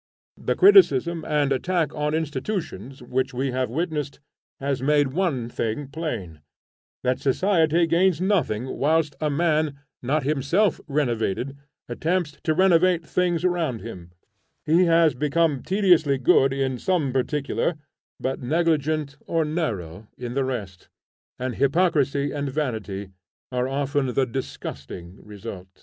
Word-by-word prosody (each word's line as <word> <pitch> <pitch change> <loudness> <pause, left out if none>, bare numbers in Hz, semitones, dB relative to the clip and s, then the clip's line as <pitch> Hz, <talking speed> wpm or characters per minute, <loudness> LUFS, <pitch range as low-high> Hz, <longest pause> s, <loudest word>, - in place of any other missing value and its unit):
The - - -1
criticism 170 - +5
and 145 -2 +1
attack 160 +2 0
on 150 0 -1
institutions, 140 - -4
which 125 +1 -2
we 135 +1 -1
have 130 -1 -1
witnessed, 150 0 -3 0.4
has 135 -2 -2
made 145 0 +3
one 150 -9 0
thing 120 +4 -3
plain, 120 - -5 0.6
that 125 0 +1
society 165 +2 +2
gains 170 +1 +2
nothing 145 - 0
whilst 150 0 +2
a 155 - +1
man, 155 -1 +1 0.2
not 135 +4 0
himself 155 +8 +1
renovated, 130 -3 -1 0.3
attempts 155 +5 -1
to 155 - +2
renovate 180 -1 +4
things 175 0 0
around 165 -10 0
him: 90 -7 -9 0.6
he 170 +4 +4
has 165 -2 +4
become 150 0 +1
tediously 180 -8 +3
good 135 +1 +4
in 135 -2 -1
some 160 -9 0
particular 145 +5 -1 0.4
but 130 0 -3
negligent 155 0 0
or 165 -1 +1
narrow 110 - -3
in 120 -1 -5
the 135 +1 +1
rest; 105 -9 -5 0.5
and 125 -1 -4
hypocrisy 140 -1 +2
and 145 -1 -3
vanity 110 -9 -3 0.4
are 125 0 0
often 140 0 -1
the 135 - +3
disgusting 95 -7 -7
result. 95 -3 -10
145 Hz, 130 wpm, -24 LUFS, 130-165 Hz, 0.6 s, criticism